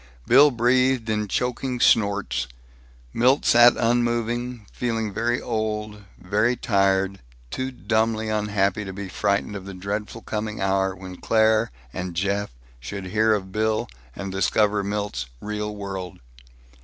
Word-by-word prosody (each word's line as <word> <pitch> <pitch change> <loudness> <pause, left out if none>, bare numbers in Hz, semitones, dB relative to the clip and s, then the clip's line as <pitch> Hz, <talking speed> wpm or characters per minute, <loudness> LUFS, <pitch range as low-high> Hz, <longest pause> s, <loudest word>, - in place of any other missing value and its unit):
Bill 140 +5 +7
breathed 125 -1 +2
in 105 -1 -1
choking 125 +3 -2
snorts. 100 - +2 0.7
Milt 130 +4 +3
sat 120 +1 +7
unmoving, 120 0 0
feeling 115 -4 -2
very 120 +4 0
old, 105 -2 -3
very 105 +6 +1
tired, 95 -3 +1 0.3
too 130 - -2
dumbly 110 -2 0
unhappy 105 -2 0
to 95 -1 -6
be 100 0 -6
frightened 100 +2 -1
of 95 -2 -7
the 100 -1 -8
dreadful 105 +4 -5
coming 110 0 -4
hour 95 0 +1
when 95 -1 -9
Claire 110 0 +3 0.2
and 90 -2 -5
Jeff 100 +3 -1 0.3
should 100 +9 -6
hear 110 0 +4
of 95 -2 -5
Bill, 110 +1 0 0.3
and 100 -1 -5
discover 100 +1 +2
Milt's 100 -11 -3
real 105 +2 -4
world. 95 -3 -6
105 Hz, 130 wpm, -24 LUFS, 100-115 Hz, 0.7 s, Bill